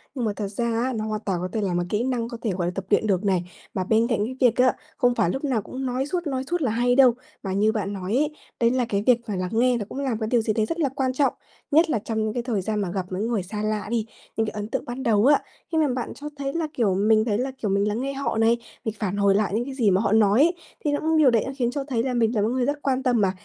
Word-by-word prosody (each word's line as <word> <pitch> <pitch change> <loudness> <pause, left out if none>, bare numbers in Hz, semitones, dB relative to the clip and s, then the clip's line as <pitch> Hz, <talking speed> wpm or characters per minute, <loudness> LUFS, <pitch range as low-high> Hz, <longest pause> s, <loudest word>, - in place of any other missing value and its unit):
nhưng 250 -3 -1
mà 210 - 0
thật 205 -2 -3
ra 215 +4 -3 0.2
á, 260 0 -1
nó 215 0 -2
hoàn 215 0 -3
toàn 190 -3 0
có 185 - -2
thể 220 - 0
là 190 -3 -1
một 175 0 +1
kỹ 210 +2 0
năng 245 -3 -1
có 235 - -6
thể, 220 - -1
gọi 175 -2 -1
là, - - -1
tập 195 -1 -4
luyện 215 +1 +3
được 190 0 +1
này. 185 -3 +2 0.3
Mà 185 - -1
bên 225 +4 +2
cạnh 220 -4 0
cái 255 +3 -5
việc 245 -2 +5
á, 255 -1 +4 0.2
không 245 -3 +3
phải 170 - +2
lúc 270 +10 -3
nào 250 -7 +1
cũng 260 +5 -6
nói 255 +2 -1
suốt, 345 +2 -2
nói 265 -2 -2
suốt 350 -1 0
là 250 -6 +1
hay 245 +2 +2
đâu, 260 -3 +7 0.3
mà 190 - -2
như 210 +3 +3
bạn 205 -2 -2
nói 190 +2 -3
ấy, 295 +3 +2 0.3
đấy 235 0 +4
là 255 -2 +1
cái 200 -1 0
việc 235 -1 +4
phải 210 -4 -3
lắng 180 0 -2
nghe 245 +2 +3
nó 210 - -4
cũng 275 - -6
là 265 -4 -1
cái 220 - -2
điều 240 -1 +3
gì 220 -1 0
đấy 215 0 +1
rất 330 +9 -4
là 290 -4 +2
quan 260 -1 -1
trọng, 275 +1 +2 0.4
nhất 320 +3 +5
là 235 -8 +1
trong 220 +1 -2
những 215 0 -1
cái 240 - -2
thời 225 -6 -1
gian 210 +1 -1
mà 180 - -2
gặp 185 -1 -2
những 200 +5 -1
người 225 -6 0
xa 210 +3 -5
lạ 215 -2 -1
đi, 230 -2 0 0.3
những 225 - +2
cái - - -2
ấn 210 0 -4
tượng - - -3
ban 245 +2 -5
đầu 215 -3 +3
á, 285 +1 +6 0.3
khi 320 - 0
mà 310 -2 +4
bạn 250 -2 -3
cho 295 - -7
thấy 275 0 -3
là, 330 -2 -1
kiểu, 205 -6 +1
mình 215 +2 +3
thấy 210 -3 +1
là, 265 +2 -1
kiểu, 210 - -2
mình 200 +1 +2
lắng 215 +3 -1
nghe 275 +1 -2
họ 275 -4 -2
này, 225 +1 +4 0.3
mình 220 0 -2
phản 205 -2 -2
hồi 200 -1 +4
lại 210 -1 +1
những 235 - 0
cái 275 - -6
gì 230 -7 +2
mà 190 +1 +3
họ 200 -2 0
nói 215 0 +4
ấy, 340 +4 +4 0.3
thì 295 - +2
những 315 +2 +1
điều 295 -4 +6
đấy 225 -3 +3
đã 270 - -4
khiến 240 -2 +1
cho 280 0 -3
thấy 250 -5 -1
là 260 0 -1
mình 225 +1 +2
là 210 - +2
một 210 - +2
cái 235 - -1
người 255 -1 +1
rất 290 +1 -2
quan 265 -1 0
tâm 245 -4 +2
mà, 190 -2 +3
230 Hz, 330 wpm, -24 LUFS, 205-260 Hz, 0.4 s, đâu